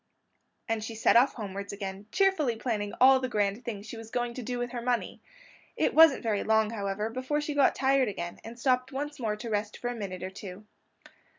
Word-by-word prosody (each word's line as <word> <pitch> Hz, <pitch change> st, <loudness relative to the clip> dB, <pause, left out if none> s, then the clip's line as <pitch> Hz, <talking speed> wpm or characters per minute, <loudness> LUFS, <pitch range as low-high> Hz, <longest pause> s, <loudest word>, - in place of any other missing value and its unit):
And 225 Hz, -2 st, -1 dB
she 225 Hz, +1 st, -6 dB
set 220 Hz, -, +3 dB
off 250 Hz, +4 st, +5 dB
homewards 200 Hz, -2 st, -5 dB
again, 195 Hz, 0 st, -6 dB
cheerfully 380 Hz, -11 st, +2 dB
planning 215 Hz, -3 st, -2 dB
all 265 Hz, +1 st, +7 dB
the 255 Hz, -1 st, -3 dB
grand 205 Hz, 0 st, 0 dB
things 210 Hz, -4 st, -5 dB
she 225 Hz, -, -8 dB
was 225 Hz, 0 st, -9 dB
going 240 Hz, 0 st, -2 dB
to 255 Hz, -, -6 dB
do 245 Hz, +1 st, -4 dB
with 245 Hz, 0 st, -3 dB
her 245 Hz, -2 st, -4 dB
money. 240 Hz, 0 st, -2 dB, 0.6 s
It -, -, +1 dB
wasn't 320 Hz, -5 st, +7 dB
very 215 Hz, -3 st, 0 dB
long, 220 Hz, 0 st, +2 dB
however, 210 Hz, 0 st, -3 dB
before 260 Hz, +5 st, -1 dB
she 295 Hz, 0 st, -3 dB
got 285 Hz, -2 st, +4 dB
tired 270 Hz, -1 st, +3 dB
again 175 Hz, -4 st, -5 dB
and 235 Hz, +2 st, -10 dB
stopped 255 Hz, 0 st, +1 dB
once 290 Hz, +2 st, -4 dB
more 220 Hz, -4 st, -1 dB
to 230 Hz, +3 st, -8 dB
rest 210 Hz, 0 st, -2 dB
for 245 Hz, -, -3 dB
a -, -, -5 dB
minute 185 Hz, -5 st, -5 dB
or 185 Hz, -, -4 dB
two. 195 Hz, +1 st, -9 dB
230 Hz, 215 wpm, -29 LUFS, 205-255 Hz, 0.6 s, all